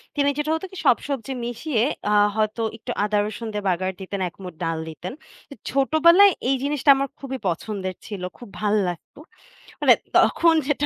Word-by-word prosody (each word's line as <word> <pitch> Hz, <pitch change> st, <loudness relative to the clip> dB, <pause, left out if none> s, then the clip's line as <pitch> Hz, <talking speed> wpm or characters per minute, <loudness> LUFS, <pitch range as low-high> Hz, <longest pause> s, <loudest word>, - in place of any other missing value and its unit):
তিনি 285 Hz, 0 st, +2 dB
যেটা 300 Hz, +1 st, -1 dB
হতো 320 Hz, -, -4 dB
কি, 380 Hz, -, -10 dB
সব 250 Hz, -, +6 dB
সবজি 270 Hz, -2 st, -3 dB
মিশিয়ে 240 Hz, 0 st, -1 dB, 0.3 s
আ -, -, +1 dB, 0.2 s
হয়তো 215 Hz, +1 st, 0 dB, 0.2 s
একটু -, -, -6 dB
আদা 210 Hz, 0 st, +1 dB
রসুন 220 Hz, +2 st, -6 dB
দিয়ে 205 Hz, -1 st, -3 dB
বাগার 185 Hz, +1 st, 0 dB
দিতেন 195 Hz, +1 st, -5 dB
এক -, -, -29 dB
মুঠ 180 Hz, -2 st, -7 dB
ডাল 165 Hz, -1 st, -1 dB
দিতেন। 175 Hz, +7 st, -7 dB, 0.4 s
এ -, -, -6 dB, 0.2 s
ছোটবেলায় 335 Hz, +8 st, +5 dB, 0.2 s
এই 270 Hz, -, +3 dB
জিনিসটা 285 Hz, 0 st, 0 dB
আমার 275 Hz, +1 st, -1 dB
খুবই 265 Hz, -1 st, -5 dB
পছন্দের 185 Hz, +1 st, -3 dB
ছিল। 205 Hz, -4 st, -6 dB, 0.2 s
খুব 240 Hz, -4 st, -12 dB
ভাল্লাগতো 205 Hz, -, -1 dB, 0.6 s
মানে -, -, +7 dB, 0.2 s
তখন 335 Hz, -1 st, +5 dB
যেটা 290 Hz, 0 st, +1 dB
230 Hz, 175 wpm, -23 LUFS, 200-285 Hz, 0.6 s, মানে